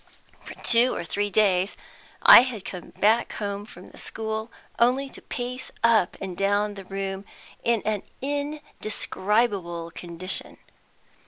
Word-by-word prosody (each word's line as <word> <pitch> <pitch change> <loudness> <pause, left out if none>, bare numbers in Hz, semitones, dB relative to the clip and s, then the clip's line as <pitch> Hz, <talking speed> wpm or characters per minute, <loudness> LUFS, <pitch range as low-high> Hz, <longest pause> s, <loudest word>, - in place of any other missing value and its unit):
For - - -9
two 240 +2 +4
or - - -3
three 205 +5 -1
days 195 -1 +2 0.5
I - - +11
had 245 -6 -4
come 180 -2 -7
back 220 +3 +2
home 205 -1 -4
from 180 - -13
the - - -10
school 220 +1 -4 0.3
only 255 +4 +3
to - - -10
pace 250 +1 -5
up 225 -6 +3
and 190 -2 -5
down 205 +2 +1
the 195 -2 -10
room 195 0 -4 0.4
in 235 -2 +1
an 215 -2 0 0.2
indescribable 215 - -2
condition. 175 +2 -3
205 Hz, 135 wpm, -25 LUFS, 195-235 Hz, 0.5 s, I